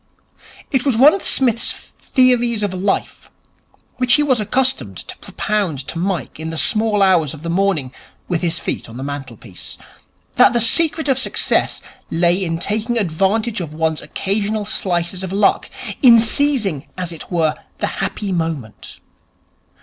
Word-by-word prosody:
It 265 -4 +1
was 270 -6 +1
one 285 +6 +7
of 390 - -3
Psmith's 240 -3 +3
theories 240 -4 0
of 200 -2 -1
Life, 195 +2 -2 0.7
which 250 -1 +3
he 295 - +3
was 260 -5 +2
accustomed 260 +5 0
to - - -8
propound 190 -11 -2
to 165 - -4
Mike 180 -3 -3
in 160 0 -4
the 160 - -5
small 215 +2 +2
hours 170 -6 +2
of 150 - -13
the 170 - -3
morning 175 -8 0 0.4
with 175 -2 -1
his 170 -2 0
feet - - -4
on 115 - -10
the 130 - -6
mantelpiece, 130 -9 -8 0.6
that - - +6
the 240 - +2
secret 315 +7 +4
of 265 -2 +2
success - - 0 0.3
lay 175 +3 +2
in 165 -2 -2
taking 220 +6 -2
advantage 205 +3 0
of 155 -3 -7
one's 160 -1 -1
occasional 205 +2 -2
slices 180 -2 -2
of 190 - -5
luck, 200 +1 +1 0.3
in 240 -3 +8
seizing, 220 - +1
as 180 -2 -3
it 165 +2 -10
were, 160 -3 +1 0.2
the - - -1 0.2
happy 205 -2 -3
moment. 160 - -4
195 Hz, 155 wpm, -18 LUFS, 165-235 Hz, 0.7 s, in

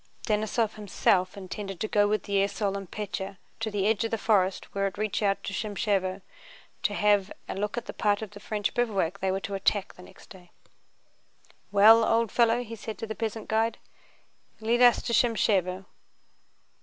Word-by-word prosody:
Denísov 215 0 0
himself 190 -2 +1
intended 195 -1 -6
going 205 -1 +3
with 210 -2 0
the 200 -1 -1
esaul 200 0 -1
and 195 -3 -6
Pétya 195 -2 -5 0.2
to 225 -1 -2
the 205 -2 -1
edge 220 +1 +2
of 225 - -1
the 225 - -1
forest 195 -4 +1
where 195 0 0
it 195 - -7
reached 215 +1 -1
out 200 -1 +1
to 200 - -5
Shámshevo, 195 -2 -1 0.6
to 205 - 0
have 205 -1 +2 0.2
a - - -4
look 205 +3 -3
at 240 - -3
the - - -7
part 205 0 +1
of 210 - -8
the 205 - -11
French 205 -1 -2
bivouac 200 -6 0
they 190 0 0
were 190 - -1
to 200 - -5
attack 195 0 0
next 180 - -15
day. 180 -2 -14 1.2
"Well, 220 +3 +7
old 225 -1 +2
fellow," 235 0 +3
said 220 0 -6
he - - -33
to 225 - -5
the 220 - -5
peasant 220 -1 -4
guide, 225 +1 +1 0.8
"lead 230 +2 +1
us 245 -1 +6
to 235 - -2
Shámshevo." 195 -5 +2
205 Hz, 180 wpm, -27 LUFS, 195-220 Hz, 1.2 s, Well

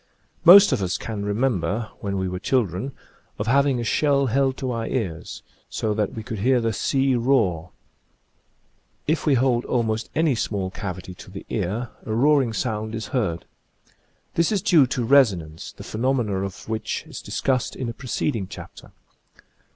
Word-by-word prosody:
Most 195 +4 +9
of - - +1
us 95 -1 -1
can 105 -3 -5
remember, 110 0 -1
when 100 -1 -3
we 95 0 -1
were 90 0 -4
chil 125 +4 +2
dren, 95 +9 -5 0.5
of 105 - -2
having 135 +2 +3
a - - -2
shell 140 +4 +2
held 135 +2 +1
to 130 -2 -3
our 115 -1 -3
ears, 95 -11 -4 0.3
so 110 -1 -1
that 105 -1 -1
we 110 - -5
could 110 -3 -5
hear 125 +4 +3
the 115 -1 0
"sea 135 +6 +1
roar." 115 -10 +1 1.4
If 155 +1 0
we 145 - +5
hold 125 -1 +2
almost 115 -2 -1
any 160 -2 +3
small 100 -5 -2
cavity 95 -2 -6
to 90 - -13
the 95 +1 -9
ear 110 +4 -2
a 110 - -3
roaring 135 -1 +3
sound 110 -1 -2
is 110 - -5
heard. 95 - -1 0.9
This 170 +3 +2
is 200 -4 0
due 150 -7 +5
to 125 -1 -2
reso 130 -6 +5
nance, 80 -1 -9
the - - -11
phenomena 115 -3 0
of 95 -1 -6
which 110 0 -3
is - - -8
discussed 130 -2 -1
in 130 - -4
a 115 - -3
preceding 120 -5 -2
chapter. - - -11
115 Hz, 175 wpm, -23 LUFS, 100-135 Hz, 1.4 s, Most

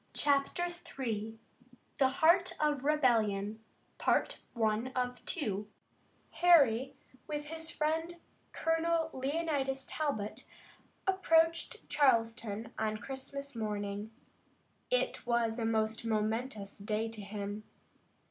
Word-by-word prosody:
CHAPTER 285 +5 +2 0.3
III 225 -3 -2 0.6
THE 265 -2 +5
HEART 340 +7 +4
OF 295 -3 +1
REBELLION 220 -8 +2 2.7
Harry, 275 -7 +5 0.3
with 295 0 -3
his 320 +1 -4
friend 320 +2 -1 0.4
Colonel 325 0 +1
Leonidas 270 -1 -1
Talbot, 235 -6 -3 0.6
approached 330 -3 +2
Charleston 230 -5 +1
on 215 -1 0
Christmas 275 +3 -6
morning. 205 -1 -3 0.8
It - - 0
was 235 -1 +1
a 225 - 0
most 220 0 0
momentous 220 -1 -2
day 215 +2 -1
to 225 -2 -8
him. 205 +1 -5
260 Hz, 85 wpm, -33 LUFS, 220-305 Hz, 2.7 s, THE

